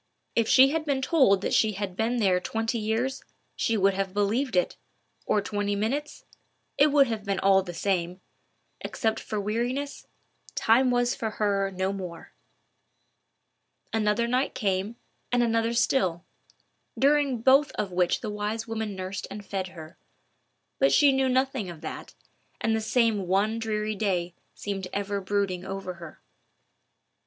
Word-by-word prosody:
If 230 -1 +2
she 265 +1 +7
had 315 +2 -1
been 280 -3 -1
told 260 - +4
that - - -2
she 220 -1 +3
had 195 -2 -4
been 225 +4 0
there 190 -5 +3
twenty 225 +4 -2
years, 225 +5 -1 0.3
she 230 -2 0
would 195 0 +3
have 195 0 -3
believed 220 +4 0
it—or 195 +3 -2
twenty 205 0 -1
minutes—it 280 +4 -2
would 285 -1 +5
have 225 -4 -4
been 200 -1 -1
all 195 0 +5
the 175 -2 -8
same: 180 0 -1 0.6
except 225 -2 -2
for 215 - -4
weariness, 240 +7 -3 0.5
time 250 +4 +4
was 245 0 +2
for 220 - -3
her 200 -2 0
no 190 +1 -2
more. 180 -4 -8 1.6
Another 220 +1 +1
night 255 +3 0
came, 195 +2 -1 0.4
and 245 0 +3
another 230 0 +1
still, 190 -8 +1 0.7
during 280 -3 +3
both 270 +5 +4
of 200 -3 -3
which 180 -1 +1
the 215 - -4
wise 210 +2 -3
woman 220 -2 -3
nursed 185 +1 -5
and 205 0 -8
fed 190 -2 -3
her. 165 -2 -12 0.8
But 275 - +4
she 290 -2 +6
knew 265 -1 +2
nothing 260 -5 0
of 165 -3 -9
that, 160 - -7 0.4
and 225 0 +1
the 220 - -1
same 220 -4 +1
one 205 +5 +1
dreary 215 -1 -2
day 185 -4 -1 0.2
seemed 195 -2 -4
ever 200 0 -2
brooding 190 -2 -1
over 190 -1 -5
her. 170 -2 -11
210 Hz, 150 wpm, -27 LUFS, 195-240 Hz, 1.6 s, she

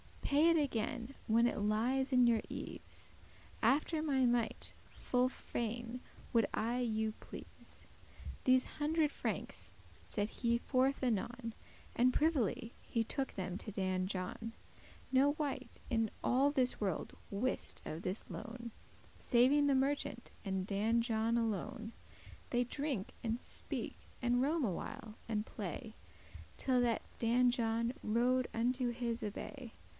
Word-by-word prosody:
Pay 295 +4 +5
it 335 - +5
again 255 -2 -1
when 230 +2 +5
it 240 - +1
lies 240 +6 +1
in 250 -1 +7
your 230 -2 +4
ease; - - -7 0.5
After 295 +7 +3
my 275 -4 +3
might 240 -2 +1 0.2
full 250 0 +1
fain 240 -1 -3 0.3
would 230 -3 +4
I 235 +3 0
you 220 -2 +1
please." - - -11 0.6
These 255 0 +6 0.2
hundred 305 0 +2
frankes - - -4 0.3
set 205 +1 -2
he 235 0 +1
forth 265 +2 +1
anon, 235 0 -1 0.4
And 250 +1 +5
privily 260 - +1
he 230 - 0
took 265 +4 -2
them 185 -1 -3
to 210 0 -6
Dan 185 -2 0
John; 195 +4 -4 0.6
No 270 +2 +5
wight 280 -3 -3
in 225 -2 +2
all 265 +3 +4
this 260 -3 +1
world 195 -6 -2
wist 230 +6 -1
of 160 +2 -4
this 185 +4 -3
loan, 235 +1 -6 0.5
Saving 270 +4 +5
the 280 - +4
merchant 265 -2 0
and 190 -1 -1
Dan 215 +4 +2
John 230 0 +1
alone. 220 0 -2 0.6
They 245 0 +3
drink, 260 -4 -2
and 230 0 -1
speak, - - -4 0.2
and 245 0 +3
roam 305 +3 +2
a 215 - +2
while, 225 +3 -6
and 215 -2 -1
play, 215 +3 -5 0.6
Till 255 -2 +2
that 235 -2 +2 0.2
Dan 245 +2 +4
John 230 0 +1
rode 245 +3 +2
unto 245 +2 +1
his 235 0 -2
abbay. 230 +4 -6
240 Hz, 135 wpm, -36 LUFS, 220-260 Hz, 0.6 s, in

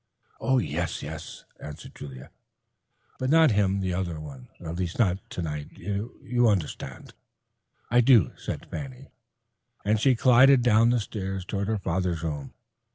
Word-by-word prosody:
"Oh, 130 +3 +2
yes, 85 - -2
yes," 80 +1 -8
answered 75 -1 -9
Julia, 65 -2 -10 0.9
"but 130 - -1
not 160 -2 +6
him, 100 -2 +2
the 95 -1 -1
other 90 -3 -2
one—at 75 +3 -9
least 90 -1 -3
not 95 -5 +2
tonight. 75 -4 -5
You 115 +5 -1
understand." 95 -8 -3 0.8
"I 120 +1 +6
do," 115 - +5
said - - -6
Fanny, 135 -1 -7 0.7
and 105 +1 +2
she 130 +3 +4
glided 130 +2 +6
down 115 -1 +5
the 120 0 +3
stairs 95 -3 -4
toward 100 +1 -2
her 110 0 0
father's 90 -3 -1
room. 75 -4 -4
95 Hz, 140 wpm, -26 LUFS, 80-120 Hz, 0.9 s, not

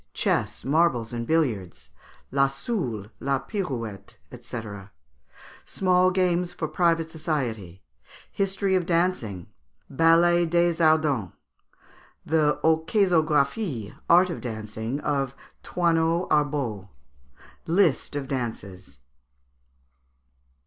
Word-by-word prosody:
Chess, - - -1
Marbles, 135 -6 +1
and 115 -1 -4
Billiards. 120 - -1 0.4
La 135 +1 +3
Soule, 135 - -4
La 135 0 0
Pirouette, 120 - -5 0.3
&c. 120 -1 -6 1.0
Small 185 -1 +2
Games 180 -1 +1
for 155 - -3
Private 165 0 +1
Society. 120 - -4 0.5
History 195 0 -1
of 180 -2 +1
Dancing. 165 - 0 0.5
Ballet 170 +3 +4
des 170 +1 +2
Ardents. 155 - +2 0.9
The 150 -1 +2
"Orchésographie" 160 - +1
(Art 180 +2 +5
of - - -6
Dancing) 110 +2 -5
of 135 -3 -1 0.3
Thoinot 170 0 +1
Arbeau. 140 -10 0 0.8
List 165 -5 +2
of 140 -2 -3
Dances. 100 - -5
150 Hz, 90 wpm, -25 LUFS, 120-170 Hz, 1.0 s, Art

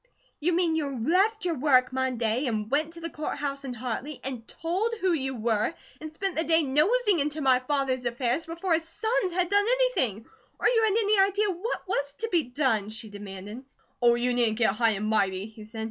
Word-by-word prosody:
"You 345 +4 +1
mean 340 -1 +2
you 285 -4 -2
left 420 +3 +2
your 345 - +1
work 255 -3 +3
Monday, 255 -1 0
and 215 -1 -2
went 305 +3 +1
to 335 - -10
the 335 0 -5
Court 305 - -4
House 280 -1 -3
in 255 -2 -5
Hartley 255 +4 -5
and 250 -3 -6
told 380 +8 -2
who 370 -3 +2
you 265 -4 -2
were, 225 +5 0 0.2
and 310 0 -7
spent 385 +3 -3
the 320 - +1
day 330 -1 +4
nosing 365 - +2
into 295 +2 -1
my 260 -3 +4
father's 260 -1 -1
affairs, 240 +6 -1
before 335 +2 -1
his 325 0 +1
SONS 390 +3 -1
had 360 +1 0
done 405 0 +4
anything, 485 - +1 0.3
or - - +3
you 460 -2 +3
had 425 0 +2
any 420 -2 +3
idea 400 +1 +3
WHAT 380 +4 -4
was 285 -6 -2
to 455 - -3
be 340 -4 +2
done?" 245 -5 0
she 220 0 -5
demanded. 205 +3 -8 0.4
"Oh, 240 -1 +5
you 245 +1 0
needn't 235 -3 +1
get 230 -2 +3
so - - 0
high 230 +1 +2
and 210 - -3
mighty," 200 -3 +1
he 220 0 -12
said. 220 +1 -9
280 Hz, 215 wpm, -27 LUFS, 240-350 Hz, 0.4 s, Oh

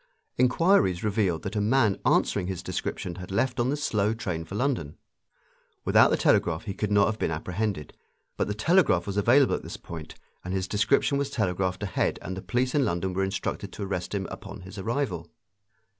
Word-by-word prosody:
Inquiries 125 - +3
revealed 100 -6 0
that - - -4
a 105 - +1
man 110 -2 +2
answering 95 -3 +2
his 95 -2 -4
description 85 - -4
had 90 -1 -8
left 125 +7 0
on 120 +1 +2
the 145 - 0
slow 110 -7 0
train 90 -7 -3
for 80 +5 -8
London. 120 - -1 0.9
Without - - +6
the - - +2
telegraph 80 -2 +2
he 100 -4 -4
could 105 +1 -3
not 100 -1 +5
have 110 0 -2
been - - 0
apprehended. 90 +2 -3 0.4
But - - -1
the 105 - -2
telegraph 135 - +3
was 100 - -4
available 125 +7 +4
at - - -1
this - - -7
point, 80 -2 -9 0.3
and 90 +1 -3
his 95 -1 -1
description 140 +6 +2
was 140 -1 -1
telegraphed 95 -6 -1
ahead 100 - 0
and 95 - -4
the 95 - -6
police 125 +4 0
in 145 - +3
London 90 -1 -1
were 95 +1 0
instructed 95 0 -3
to 105 - -5
arrest 95 0 -3
him 95 -1 -2
upon 100 -1 -8
his 95 +2 -9
arrival. 100 - -2
100 Hz, 195 wpm, -27 LUFS, 90-120 Hz, 0.9 s, Without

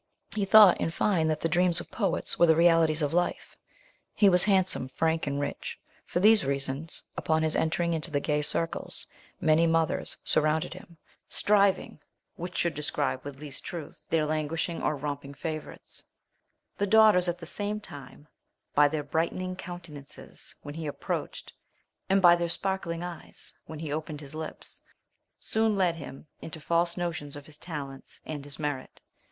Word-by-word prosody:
He 205 -2 0
thought, 205 -1 +8
in - - +1
fine, 165 -1 +1
that 155 -1 -1
the - - +1
dreams 175 +1 +3
of - - -10
poets 195 -6 -1
were 170 - +6
the 160 - +6
realities 165 -2 +4
of 145 - -1
life. 175 +1 -1 0.6
He 205 - +6
was 180 -1 +8
handsome, 190 -9 +2
frank, 160 +4 0
and 140 0 -1
rich: 145 - -4 0.3
for - - -1
these 215 +2 +6
reasons, 140 +3 -2
upon 160 0 +1
his 155 0 0
entering 170 +1 +1
into 160 +1 0
the 145 -2 0
gay 150 +1 0
circles, 165 +2 -1 0.3
many 160 +1 +4
mothers 165 -1 0
surrounded 155 +2 +1
him, 185 -2 -13 0.3
striving 200 -5 +2 0.4
which 175 +1 -6
should 170 - +1
describe 145 -3 -2
with 140 -1 -8
least 145 -2 -7
truth 165 -4 -7
their 160 -2 +2
languishing 155 +2 -2
or 150 - 0
romping 140 0 -5
favourites: 155 0 -7 0.8
the 205 - +1
daughters 215 -4 +6
at 175 - -2
the 170 - -9
same 205 +4 -3
time, 145 -6 -10 0.5
by 145 0 +6
their 150 0 -2
brightening 170 +5 -2
countenances 165 -6 -9
when 145 - -7
he 160 0 -5
approached, 145 - -4 0.6
and 195 0 +3
by 175 -1 +9
their 170 0 -1
sparkling 175 -2 -1
eyes, 175 -2 -7
when 160 - -7
he 150 -1 -4
opened 155 -1 -4
his 145 -1 -9
lips, 155 0 -8 0.6
soon 220 -1 +1
led 180 -4 +1
him 145 -1 -9 0.2
into 160 0 -7
false 170 +3 +1
notions 160 -5 -3
of 145 -1 -9
his 155 -1 -12
talents 140 -5 -7
and 145 -3 -6
his 145 -1 -7
merit. 145 -4 -4
160 Hz, 165 wpm, -28 LUFS, 150-175 Hz, 0.8 s, by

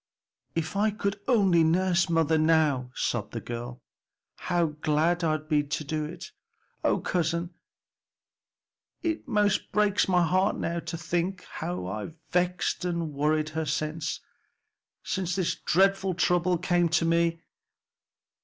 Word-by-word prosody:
"If 165 +3 -2
I 210 +2 +3
could 200 -1 -2
only 195 -9 +4
nurse 175 +1 +2
mother 165 -1 +2
now," 155 -5 +2
sobbed - - -2
the - - -3
girl, 120 +1 -7 0.7
"how 175 -1 +3 0.2
glad 165 +4 +2
I'd 155 -1 0
be 150 -2 +3
to 145 +1 -3
do 155 +1 -2
it. 160 +3 -8 0.5
O - - +3
cousin, 170 0 -1 1.5
it 325 -4 -2
most 210 -4 +1
breaks 210 -1 +2
my 180 -2 +3
heart 185 +4 +2
now 170 0 -2
to 165 - -5
think 175 +3 -2
how 170 - -5
I've 105 - -5 0.2
vexed 180 0 0
and 170 -3 -2
worried 155 +2 +1
her 160 0 -3
since 155 +2 -2 0.8
since 180 -2 -2
this 185 -3 0
dreadful 195 +1 +2
trouble 180 0 +2
came 175 0 +1
to 165 +1 +2
me. 165 0 +1
170 Hz, 135 wpm, -27 LUFS, 155-185 Hz, 1.5 s, only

